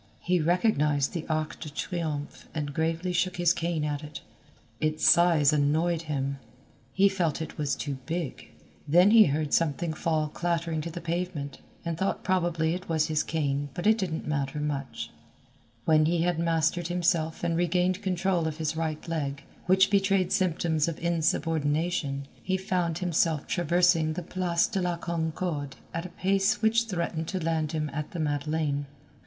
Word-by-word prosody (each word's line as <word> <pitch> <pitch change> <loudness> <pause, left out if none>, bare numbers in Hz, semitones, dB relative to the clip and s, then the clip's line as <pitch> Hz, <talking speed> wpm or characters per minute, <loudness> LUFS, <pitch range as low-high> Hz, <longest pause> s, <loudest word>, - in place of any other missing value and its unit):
He 180 0 +1
recognized 150 -5 +2
the 170 -3 -4
Arc 155 -1 -2
de 155 - -6
Triomphe 155 -2 -4
and 145 -2 -3
gravely 165 +4 -1
shook 180 +1 0
his 175 0 +4
cane 170 -3 -1
at 145 0 -2
it. 150 0 -8 0.6
Its 155 0 +1
size 165 -4 +5
annoyed 155 +3 +2
him. 140 -1 -2 0.5
He 195 +9 +4
felt 180 -6 0
it 160 0 -6
was 145 -2 0
too 140 -3 -4
big. 165 -4 -4 0.4
Then 175 +7 +6
he 220 -1 +8
heard 150 -1 -1
something 165 +1 +1
fall 155 -1 0
clattering 165 -1 -1
to 170 - -5
the 170 +1 -7
pavement 170 -4 -3 0.3
and 165 -1 -3
thought 195 - -1
probably 170 -3 +1
it 180 +1 -6
was 160 -1 +1
his 155 -1 +2
cane 145 -2 -1
but 175 - -4
it 220 +1 +4
didn't 170 -7 -3
much 140 -2 -1
matter. 150 -2 -2 1.0
When 155 -1 +5
he 170 0 +1
had 175 -2 0
mastered 165 +1 +1
himself 170 -2 0
and 170 -1 +1
regained 180 +2 +1
control 185 -3 0
of 155 -1 -4
his 160 0 -2
right 160 -1 -3
leg, 140 -4 -3 0.2
which 190 +1 +5
betrayed 195 -2 +2
symptoms 165 -4 +1
of 165 - -3
insubordination, 160 -3 0 0.2
he 190 0 0
found 180 -3 -1
himself 165 -3 +1
traversing 175 -2 +2
the 175 - -4
Place 175 -1 +1
de 195 - -2
la 175 -1 -1
Concorde 160 -3 -3 0.2
at 165 +2 -3
a - - -14
pace 195 +3 +1
which 230 +1 +3
threatened 170 -5 -3
to 185 -2 -3
land 160 -1 0
him 155 -1 -1
at 150 +1 -3
the 175 - -4
Madeleine. 145 -1 -1
165 Hz, 165 wpm, -28 LUFS, 155-175 Hz, 1.0 s, he